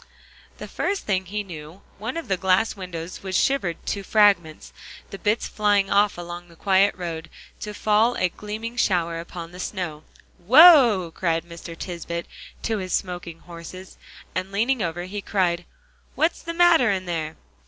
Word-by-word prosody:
The - - -8
first 400 0 -2
thing 190 -2 0
he 210 +2 -3
knew, 165 0 -10 0.2
one 230 +8 -4
of 335 - -5
the 195 - +1
glass 190 +4 +2
windows 180 -3 -7
was 190 -2 -1
shivered 225 -12 0
to 200 - -2
fragments; 195 -6 +2 0.4
the 195 - -7
bits 210 +2 0
flying 205 -2 +1
off 200 -1 +3
along 175 0 -7
the 170 - -18
quiet 195 +3 +3
road, 165 -3 -5 0.3
to 210 - -5
fall 220 +4 +3
a 185 - +1
gleaming 220 +5 -6
shower 170 -7 +1
upon 170 0 -8
the 180 - -11
snow. 175 -6 -4 0.4
"Whoa!" 240 - +7
called 165 -3 0
Mr. 170 0 -10
Tisbett, 170 -1 -5 0.4
to 220 -2 -1
his 185 -1 -4
smoking 175 -3 -3
horses, 175 +2 -11 0.3
and 185 +1 -3
leaning 230 +5 +1
over, 175 -1 -2
he 200 +3 -5
cried, 175 -3 0 0.5
"What's 320 +2 +1
the 335 0 -5
matter 335 -8 +5
in 190 -2 -1
there?" 160 -3 -3
185 Hz, 165 wpm, -24 LUFS, 170-210 Hz, 0.5 s, Whoa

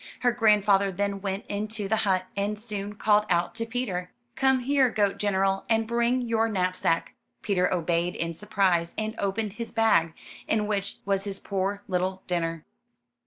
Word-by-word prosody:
Her 245 - +4
grandfather 210 -4 +3
then 200 +1 -2
went 195 0 -3
into 210 0 -3
the 220 +2 +1
hut, 190 -4 +1
and 200 +1 -1
soon 210 -2 -4
called 210 0 +3
out 175 -1 +1
to 230 0 -4
Peter: 210 -7 -3 0.3
'*Come 265 -1 +3
here, 270 0 +3
goat 205 -3 0
general, 195 -1 +1
and 225 0 +2
bring 235 +2 +1
your 225 -1 +1
knapsack.'* 185 -4 0 0.3
Peter 185 -4 +1
obeyed 170 0 0
in 165 0 -2
surprise, 185 -3 +1
and 215 0 -2
opened 200 +1 -1
his 230 +1 -5
bag, 220 -8 +3 0.3
in 215 -1 +1
which 200 -1 -2
was 195 0 0
his 200 -1 -4
poor 200 +1 -2
little 185 0 -1
dinner. 165 -2 -2
200 Hz, 165 wpm, -27 LUFS, 185-220 Hz, 0.3 s, Her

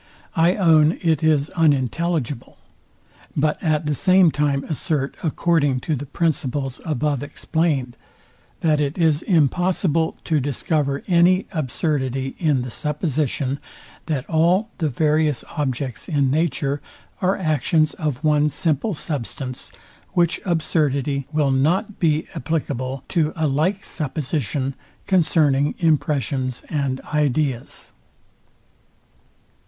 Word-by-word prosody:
I 170 +3 +4
own 160 -4 +4
it 160 -4 +2
is 155 -2 +2
unintelligible; 150 -2 0 0.8
but 150 +1 +1
at 155 -2 +1
the 150 - 0
same 185 +3 +4
time 145 -2 0
assert, 145 -2 -1
according 155 -4 +1
to 155 - -1
the 145 +1 -6
principles 135 -4 -1
above 150 -3 -1
explained, 145 -4 -1 0.7
that 155 -2 +2
it 145 +3 -1
is 160 -3 +2
impossible 165 0 +1
to 155 -2 +1
discover 140 0 -1
any 180 +1 +4
absurdity 135 -3 -2
in 150 -7 +2
the 125 - -6
supposition, 145 -2 -1 0.5
that 145 -5 -2
all 175 +7 +2
the 160 -3 +1
various 150 0 +1
objects 130 -6 -3
in 140 -4 +2
nature 145 -2 0 0.4
are 190 +1 +2
actions 155 -2 +1
of 150 -2 -3
one 150 -1 +3
simple 165 +6 -1
substance, 135 -3 -4 0.4
which 170 -1 +2
absurdity 145 -5 0
will 150 -3 +2
not 175 +10 +1
be 155 -2 +2
applicable 135 -3 -3
to 160 -4 +1
a 160 - 0
like 160 +8 0
supposition 140 - -2 0.3
concerning 150 -6 +2
impressions 140 -5 0
and 140 -4 -1
ideas. 145 -4 -1
150 Hz, 110 wpm, -22 LUFS, 140-165 Hz, 0.8 s, I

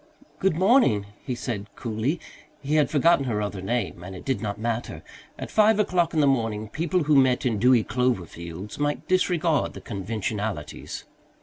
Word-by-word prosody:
"Good 190 -4 +2
morning," 185 - +4 0.2
he 125 - -3
said 115 -5 -4
coolly. 120 +8 -2 0.4
He 145 +1 -3
had 155 -2 +3
forgotten 160 -1 +3
her 115 -5 -1
other 100 -2 -3
name, 100 -3 -2
and 95 +1 -8
it 90 - -10
did 135 -2 -1
not 100 -2 -3
matter; 115 +2 -3 0.3
at - - -7
five 215 0 +5
o'clock 180 -5 +2
in 155 - +4
the - - +4
morning 110 -5 0
people 170 +5 0
who 150 0 +3
met 130 -2 +4
in 115 -5 +1
dewy 125 0 +5
clover 125 -4 0
fields 85 - -8
might 145 0 -1
disregard 175 -4 +1
the - - -9
conventionalities. 105 -4 -4
125 Hz, 175 wpm, -25 LUFS, 105-155 Hz, 0.4 s, five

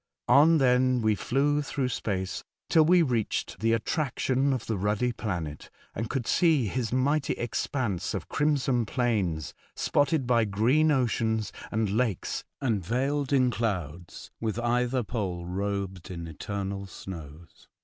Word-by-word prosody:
On 160 +3 +6
then 125 -2 +3
we 110 0 +4
flew 145 +7 +1
through 140 -3 -2
space 95 -6 -3 0.3
till 160 - +6
we 175 +2 +5
reached 120 - -1
the 115 +2 +2
attraction 135 +2 0
of 130 -4 -2
the 110 - -1
ruddy 105 +5 0
planet, 85 -10 -4 0.2
and 115 +2 -4
could 135 -4 -2
see 160 -6 +3
his 115 +2 -2
mighty 140 +4 +1
expanse 115 - -2
of 90 -5 -5
crimson 135 -6 +1
plains 100 - -1 0.2
spotted 145 -1 +1
by 120 -2 +3
green 120 +10 +3
oceans 110 -5 0 0.2
and 110 0 +1
lakes 110 -3 -1 0.2
and 110 -8 0
veiled 135 - -1
in 130 -3 +4
clouds 90 -8 -4
with 110 -1 -2
either 125 +1 +1
pole 95 -6 -3
robed 95 0 -3
in 85 -2 -6
eternal 100 +4 -5
snows. 85 -3 -10
115 Hz, 140 wpm, -28 LUFS, 100-130 Hz, 0.3 s, On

